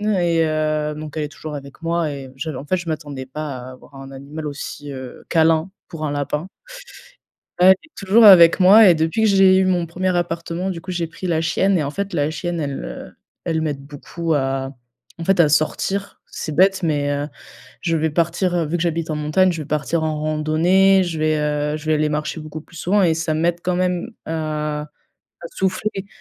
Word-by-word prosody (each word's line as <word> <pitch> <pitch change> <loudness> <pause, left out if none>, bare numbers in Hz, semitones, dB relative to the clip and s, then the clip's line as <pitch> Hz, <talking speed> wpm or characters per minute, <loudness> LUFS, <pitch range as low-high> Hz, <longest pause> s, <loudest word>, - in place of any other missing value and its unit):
et 170 -2 +2
heu, 155 -1 -1
donc 150 0 -8
elle 155 - -1
est 150 - -4
toujours 155 -1 -8
avec 140 +3 -10
moi 165 -1 0
et 135 -2 -8
je 155 +4 -5
en 135 0 -7
fait, 185 - +1
je 175 -1 -6
m'attendais 145 -4 -5
pas 145 0 -5
à 125 +1 -9
avoir 130 +2 -17
un 135 0 -10
animal 145 +3 -7
aussi, 145 0 -7
heu, 130 -2 -9
câlin 160 +1 +3 0.2
pour 165 -3 -7
un 145 - -2
lapin. 145 +5 -3 1.1
Ouais, 180 - +6
elle - - +10
est 315 - -22
toujours 200 +4 +3
avec 170 -4 +8
moi 200 +3 +8
et 175 - +6
depuis 160 +7 0
que - - +5
j'ai 195 -1 +5
eu 190 - +3
mon 180 -2 +1
1er 180 +2 -2
appartement, 170 +1 -2
du 170 -3 -5
coup, 190 - -7
j'ai 175 -2 -2
pris 165 +3 -7
la 160 -2 +1
chienne 190 +4 +1
et 155 - 0
en 140 - -3
fait, 200 +4 -4
la 150 -2 0
chienne, 175 +1 -3
elle, 140 -3 -4
heu, - - -8 0.3
elle 160 -1 -1
m'aide 145 -3 -3
beaucoup 160 +3 -4
à, 135 -1 -1 0.5
en - - -4
fait, 195 +2 +2
à 155 -3 +6
sortir. 195 +6 -1
C'est 155 - -5
bête, 190 +1 +4
mais, 145 -3 0
heu, 145 +1 -2 0.5
je 165 -2 0
vais 160 0 0
partir, 170 +3 0
heu, 165 - 0
vu 160 +3 -1
que 170 - -2
j'habite 165 -1 -1
en 155 - -2
montagne, 155 +5 +2
je 160 -2 -5
vais - - -10
partir 155 +2 -1
en 155 -1 -1
randonnée. 160 +6 +3
Je 165 -3 -4
vais, 155 0 +1
heu, 150 0 -1
je 155 0 -10
vais 155 - +3
aller 155 0 +1
marcher 150 +2 -3
beaucoup 155 0 -8
plus 165 +2 -17
souvent 195 +5 +1
et 165 -3 +3
ça 160 0 -2
m'aide 170 +2 0
quand 180 0 -1
même 180 +3 -1 0.2
à 150 -1 -3 0.5
à - - -5
souffler. 195 +1 -2
160 Hz, 220 wpm, -20 LUFS, 150-175 Hz, 1.1 s, elle